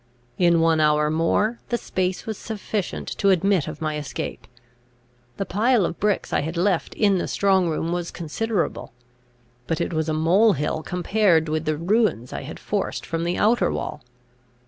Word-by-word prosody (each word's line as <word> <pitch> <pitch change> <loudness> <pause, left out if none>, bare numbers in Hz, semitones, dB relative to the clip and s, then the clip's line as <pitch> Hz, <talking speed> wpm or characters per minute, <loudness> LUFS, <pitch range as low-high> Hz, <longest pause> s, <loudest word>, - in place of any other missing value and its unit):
In 170 -2 +4
one 165 -1 +3
hour 150 0 +3
more, 205 +8 +1
the 240 - +1
space 185 -4 -2
was 220 - -3
sufficient 210 -2 -4
to 200 - +3
admit 190 -2 +2
of 155 +1 -6
my 155 -1 -1
escape. 145 - -6 0.9
The 195 - -2
pile 220 +1 +2
of 165 - -4
bricks 205 -1 0
I - - +2
had 160 +4 -4
left 180 -1 0
in 200 -4 +3
the - - -2
strong 190 -3 +2
room 165 +1 -2
was 175 -1 -2
considerable. 170 - -3 0.7
But 165 - -1
it - - -2
was 160 0 -1
a - - 0
mole 185 +8 +4
hill 150 +1 -2
compared 180 -1 +2
with 155 +1 -2
the 155 -1 0
ruins 180 - +1
I - - -4
had - - -8
forced - - -3
from 165 0 -2
the 175 - -1
outer 230 +3 +3
wall. 150 - -4
175 Hz, 175 wpm, -23 LUFS, 160-205 Hz, 0.9 s, In